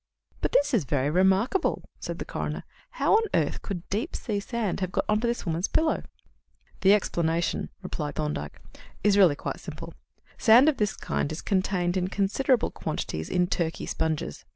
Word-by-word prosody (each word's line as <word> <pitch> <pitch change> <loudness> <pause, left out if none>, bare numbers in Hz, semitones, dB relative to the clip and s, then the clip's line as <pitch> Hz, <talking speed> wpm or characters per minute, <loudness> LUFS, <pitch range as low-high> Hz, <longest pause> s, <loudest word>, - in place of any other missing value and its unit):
"But - - 0
this 285 0 +3
is 220 -9 +3
very 140 +1 0
remarkable," 190 - +2
said - - -5
the - - -5
coroner. - - -4 0.3
"How - - +1
on - - +3
earth - - 0
could 180 -4 -6
deep 210 +4 -2
sea 210 -3 -2
sand 215 -2 -2
have 185 -1 -2
got - - 0
on 210 0 +2
to 240 - +1
this 235 -2 -2
woman's 170 +2 0
pillow?" 315 0 +1 0.8
"The 195 +2 +6
explanation," 170 -4 0
replied 150 -5 -4
Thorndyke, 150 - -3 0.4
"is 205 -1 +4
really 185 -7 +6
quite - - -5
simple. - - -8 0.5
Sand 240 +5 +7
of 310 - +3
this 210 -2 0
kind 145 - -2
is 155 - -5
contained 185 -2 0
in 180 0 0
considerable 215 +6 +1
quantities 80 0 -4
in 180 0 +2
Turkey 170 -2 -2
sponges. 155 - -2
190 Hz, 175 wpm, -27 LUFS, 165-215 Hz, 0.8 s, Sand